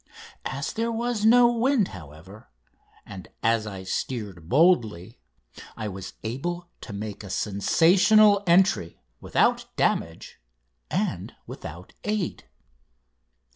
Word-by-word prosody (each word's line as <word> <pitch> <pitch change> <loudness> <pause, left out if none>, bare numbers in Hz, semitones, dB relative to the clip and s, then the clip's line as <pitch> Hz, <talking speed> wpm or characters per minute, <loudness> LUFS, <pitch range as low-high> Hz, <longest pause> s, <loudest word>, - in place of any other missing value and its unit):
As 140 +3 -4
there 230 +1 -1
was 230 -1 -1
no 240 +1 +6
wind, 240 -3 +1
however, 90 +5 -13 0.6
and 95 -3 -10 0.2
as 115 -1 +2
I 95 -2 -7
steered 95 -5 -5
boldly, 120 - +2 0.6
I 110 -2 -4
was 95 0 -8
able 170 +10 -4
to - - -9
make 105 0 -6
a 100 - -9
sensational 185 - +4
entry 175 - +3 0.2
without - - +1
damage 80 -6 -1 0.5
and - - -2
without 85 +4 -10
aid. 210 -3 -3
115 Hz, 105 wpm, -25 LUFS, -, 0.6 s, no